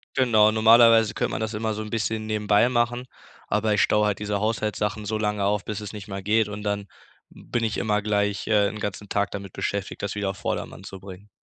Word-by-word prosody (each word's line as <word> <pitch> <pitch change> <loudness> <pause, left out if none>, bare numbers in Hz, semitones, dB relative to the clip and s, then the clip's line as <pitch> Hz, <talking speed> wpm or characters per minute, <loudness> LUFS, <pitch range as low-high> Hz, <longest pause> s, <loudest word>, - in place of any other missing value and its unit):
Genau, 110 -5 +4
normalerweise 115 0 +6
könnte - - -1
man - - -3
das 110 0 -3
immer 110 +1 -2
so 110 - -5
'n 105 - -6
bisschen 110 0 -2
nebenbei 105 +1 +2
machen, 120 0 0 0.4
aber 105 0 +1
ich 100 - +3
staue 105 0 +3
halt 105 -2 -1
diese 105 -1 -2
Haushaltssachen 105 0 -1
so 110 +1 -1
lange 105 -1 -1
auf, 105 0 0
bis 105 -1 -4
es 105 0 -7
nicht 105 0 -9
mehr 95 0 -5
geht 105 +2 +2
und 105 0 -6
dann 100 -1 -2 0.4
bin 120 - -4
ich 110 - -1
immer 105 -1 0
gleich, 105 -1 0
äh, 105 -2 +3
'n 105 - -6
ganzen 105 0 -5
Tag 100 0 -1
damit 100 -2 -7
beschäftigt, 100 -1 -3
das 100 0 -3
wieder 100 -2 -1
auf 100 - -12
Vordermann - - -4
zu 95 - -9
bringen. 95 +1 -12
105 Hz, 225 wpm, -24 LUFS, 100-110 Hz, 0.4 s, normalerweise